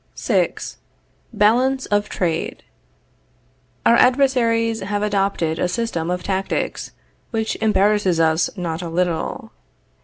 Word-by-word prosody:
VI. - - +1 0.8
BALANCE 255 +5 +2
OF 205 0 0
TRADE. 170 -3 -2 1.2
Our - - +6
adversaries 235 -4 +3
have 205 +1 -2
adopted 195 -6 0
a - - +1
system 180 -4 -2
of 180 0 -2
tactics, 195 0 -2 0.4
which 220 -2 -2
embarrasses 205 -4 +2
us 160 0 +2
not 170 -2 -3
a 170 - -5
little. 170 -1 -2
205 Hz, 110 wpm, -21 LUFS, 175-230 Hz, 1.2 s, Our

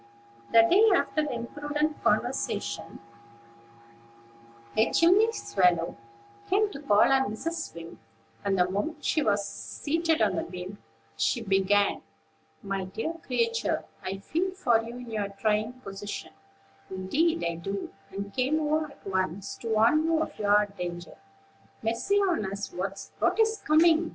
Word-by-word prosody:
The 230 - +8
day 405 - +5
after 310 - +1
the 295 - -3
imprudent 295 +5 -3
conversation, - - -1 1.8
a 220 - +3
chimney 385 +7 +5
swallow 180 - +1 0.5
came 410 +2 +2
to 275 - -8
call 210 -4 +4
on 265 -5 0
Mrs. 330 - -4
Wing; 165 0 -9 0.4
and, 200 -1 +1
the 180 0 +3
moment 295 - -3
she 310 - +2
was 205 -5 +1
seated 325 +1 -1
on 200 -3 +2
the - - +1
beam, 180 +3 -8 0.4
she 235 - +1
began: 200 0 +2 0.6
"My 195 -1 -2
dear 225 - -4
creature, 460 0 0 0.2
I 190 +1 -3
feel 330 - -1
for 240 -11 +3
you 235 +2 -8
in 245 -2 -9
your 210 -2 -2
trying 215 +3 0
position, 205 -5 -7 0.6
indeed 290 - 0
I 170 - -1
do, 195 +4 -4 0.2
and 200 +1 -6
came 265 +4 +1
over 310 +1 +1
at 280 - -18
once 190 0 -2
to 230 - -8
warn 225 +8 +4
you 325 -1 +2
of 315 -7 -4
your 205 0 +4
danger." 175 -1 -5 0.7
"Mercy 230 - 0
on 355 - +1
us! 200 0 -4
what 195 - -2
is 445 0 +3
coming?" 320 +1 +5
225 Hz, 140 wpm, -28 LUFS, 195-315 Hz, 1.8 s, The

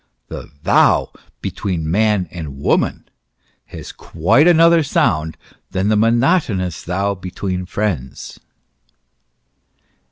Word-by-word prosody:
The - - -8
thou - - +3 0.3
between 85 -6 -3
man 105 -1 +1
and 80 -6 -7
woman 70 - 0 0.6
has - - -9
quite 90 - +2
another 170 -1 +5
sound, 80 - 0 0.3
than 95 +2 -1
the 110 - +3
monotonous 115 - +1
thou 100 +3 -1
between 90 -1 -5
friends. 75 -11 -4
95 Hz, 95 wpm, -18 LUFS, 85-110 Hz, 0.6 s, another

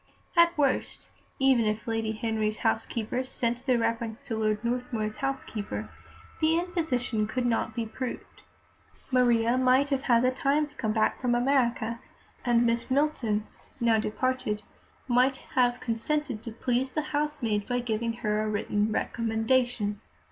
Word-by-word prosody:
At 340 0 +5
worst, 275 -3 0 0.3
even 265 -4 +4
if 215 0 -1
Lady 225 -1 -1
Henry's 215 -1 -1
housekeeper 225 +2 0
sent 245 -1 -2
the 255 -2 +4
reference 230 -1 -1
to 225 - -4
Lord 215 0 0
Northmuir's 235 -3 -2
housekeeper, 270 -6 -3 0.5
the 320 +1 +3
imposition 310 - -1
could 250 +3 -2
not 225 -2 0
be 230 - -1
proved. 250 +3 -6 0.7
Maria 240 -1 +3
might 260 +2 +4
have 275 -2 +1
had 255 0 +3
time 285 +3 +2
to 295 - -17
come 220 -7 -2
back 215 0 +1
from 245 -2 +2
America, 240 -3 +1 0.4
and 240 -1 +3
Miss 235 +1 0
Milton, 255 -7 +1 0.3
now 230 -2 +3
departed, 215 -1 -1 0.4
might 255 +2 +3 0.2
have 245 -1 +3
consented 250 +1 -2
to 230 - -7
please 250 +3 -1
the 305 - 0
housemaid 280 -9 0
by 245 -1 0
giving 230 -1 -1
her 215 -2 -1
a 215 - -1
written 210 0 0
recommendation. 225 -1 0
240 Hz, 140 wpm, -28 LUFS, 220-260 Hz, 0.7 s, At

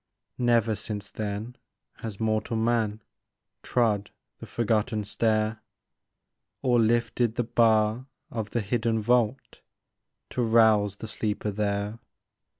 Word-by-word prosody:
Never 120 -2 +3
since 105 -1 -5
then 110 +3 -4 0.4
has 110 -3 -7
mortal 110 0 0
man 110 -2 0 0.6
Trod 105 -5 +1 0.3
the - - -9
forgotten 110 -1 0
stair, 110 +1 0 1.0
Or 125 -2 +3
lifted 115 0 +2
the 120 - +1
bar 110 +1 +2 0.2
of 110 -2 -3
the 120 - -1
hidden 115 +2 0
vault 120 +3 0 0.7
To 125 - -1
rouse 110 -3 +4
the 110 - -8
sleeper 105 -1 -2
there. 100 +1 -2
110 Hz, 110 wpm, -27 LUFS, 105-115 Hz, 1.0 s, rouse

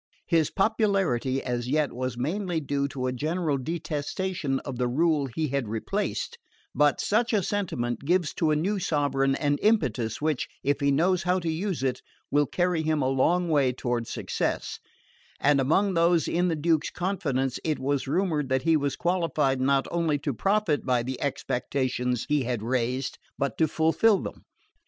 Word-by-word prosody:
His 165 -3 +2
popularity, 195 - +1
as 125 -1 -2
yet, 150 0 +1
was 130 -1 -3
mainly 170 +6 -1
due 140 -1 -1
to 135 -3 -4
a 130 - -1
general 155 +1 -1
detestation 160 +1 -2
of 130 -3 -6
the 125 - +1
rule 150 +2 +2
he 150 +5 -2
had 140 -3 -1
replaced; 110 +1 -3 0.3
but 145 +1 +3
such 230 +3 +1
a 205 -3 +2
sentiment 125 - -2
gives 175 +2 +1
to 160 - +1
a 155 - +3
new 195 +7 0
sovereign 140 -6 +1
an 145 0 0
impetus 130 - +1
which, 155 -2 -1 0.2
if 145 +1 +1
he 140 -1 +2
knows 175 +6 +2
how 180 +1 +1
to 170 -3 -1
use 175 -2 -2
it, 130 -1 -1 0.3
will 145 0 +3
carry 175 0 0
him 155 -2 0
a - - +1
long 170 +7 +2
way 145 -5 +3
toward 120 -2 -2
success; - - -2 0.6
and 140 -1 +3
among 190 +9 +2
those 170 -1 +3
in 180 +1 +1
the 165 - +1
Duke's 160 0 +1
confidence 140 -9 -1
it 155 -2 0
was 140 +1 -1
rumoured 155 -3 0
that 130 0 +1
he 165 +1 +4
was 145 -2 0
qualified 165 -7 0
not 135 +1 +2
only 165 -3 +1
to 140 0 -3
profit 195 - +1
by 125 -2 +1
the 130 +1 -5
expectations 125 -2 -1
he 150 -1 +2
had 120 -3 -2
raised 125 +2 -1 0.2
but 140 -5 -1
to 160 - +4
fulfil 165 +8 +3
them. - - -7
145 Hz, 175 wpm, -27 LUFS, 130-170 Hz, 0.6 s, he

